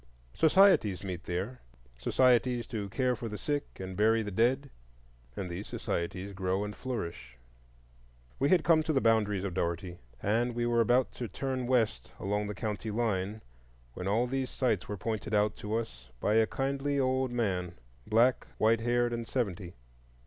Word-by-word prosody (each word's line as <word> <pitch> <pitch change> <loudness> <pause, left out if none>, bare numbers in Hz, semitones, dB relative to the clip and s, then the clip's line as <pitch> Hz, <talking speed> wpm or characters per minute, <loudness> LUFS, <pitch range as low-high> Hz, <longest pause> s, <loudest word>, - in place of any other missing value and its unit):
Societies 160 - +4
meet 90 -3 -5
there,—societies 115 - 0
"to 105 -4 -4
care 125 +4 +1
for 115 +1 -5
the 105 - -5
sick 145 +3 -3
and 95 0 -6
bury 110 +3 +3
the 105 - -5
dead"; 130 +7 +1 0.6
and 95 - -4
these 90 +4 -6
societies 90 +3 -3
grow 95 +1 -1
and 105 0 -5
flourish. 85 - -5 1.0
We 140 - +2
had 180 -4 +4
come 165 -2 +5
to 155 0 -1
the 135 - +3
boundaries 105 -5 +2
of 100 -3 -3
Dougherty, 85 0 -2 0.2
and 115 - 0
were 120 -1 +2
about 120 +3 +3
to 120 - -5
turn 130 +4 -3
west 120 -4 +1
along 105 +1 -1
the 105 - -5
county 110 +1 -3
line, 105 -2 -1 0.5
when 90 +8 -5
all 110 +5 +2
these 130 +1 -2
sights 115 -8 0
were 105 - -3
pointed 110 +1 -2
out 105 0 +2
to 105 +1 -3
us 65 - -5
by 105 - +1
a 110 0 +4
kindly 140 +2 -1
old 130 0 +1
man, 95 -8 -1 0.3
black, 120 +3 +3
white 115 +1 +3
haired, 120 0 +1
and 115 -1 -4
seventy. 95 -8 -3
110 Hz, 165 wpm, -30 LUFS, 95-125 Hz, 1.0 s, come